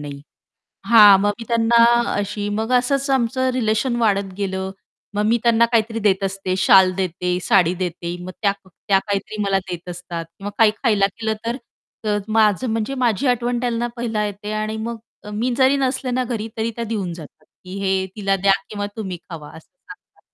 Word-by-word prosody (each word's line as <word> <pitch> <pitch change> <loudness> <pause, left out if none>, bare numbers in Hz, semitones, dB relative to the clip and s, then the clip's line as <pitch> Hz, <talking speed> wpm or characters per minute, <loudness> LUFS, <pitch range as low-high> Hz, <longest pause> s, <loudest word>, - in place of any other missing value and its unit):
नाही. 145 -1 -7 0.7
हां. 210 -4 +8
मग 205 - +2
मी 230 - -7
त्यांना 230 0 +4 0.3
अशी 205 0 -2
मग 220 +4 -2
असंच 275 +2 -1
आमचं 260 0 +1
रिलेशन 235 +1 0
वाढत 200 -4 +1
गेलं. 190 -1 -3 0.4
मग 210 - 0
मी 235 +2 +3
त्यांना 235 -1 +4
काहीतरी 225 0 +1
देत 200 -3 +1
असते 190 -1 -2
शाल 190 0 +6
देते, 180 -1 -1
साडी 180 -2 +3
देते. 175 -1 -4
मग 185 - -6
त्या 200 - +3
त्या 190 +2 0
काहीतरी 205 +1 -4
मला 195 -1 +1
देत 175 0 -6
असतात 170 -1 -6
किंवा 200 +1 -5
काही 220 -2 +6
खायला 210 -5 +3
केलं 220 -1 -1
तर 235 +2 -1 0.5
अ, 210 -1 +1
माझं 215 +1 +2
म्हणजे 225 +4 -2
माझी 240 +1 +1
आठवण 245 0 0
त्यांना 240 -1 -1
पहिला 225 -3 -1
येते. 205 +1 -6
आणि 215 +1 -2
मग 230 +1 -4 0.3
अ, 210 - -8
मी 220 +5 -1
जरी 265 +1 +4
नसले 260 -1 -1
ना, 255 +1 0
घरी 225 -2 -4
तरी 225 +1 -1
त्या 235 - -3
देऊन 205 -6 -3
जातात, 160 -4 -13 0.2
की 185 +2 -7
हे 190 -1 0
तिला 195 -2 +1
द्या 195 +1 +3 0.2
किंवा 205 -1 -3
तुम्ही 190 -5 -4
खावा 155 -3 -8
असं 160 - -15
सांगतात. 405 +9 -17
210 Hz, 185 wpm, -21 LUFS, 190-235 Hz, 0.7 s, हां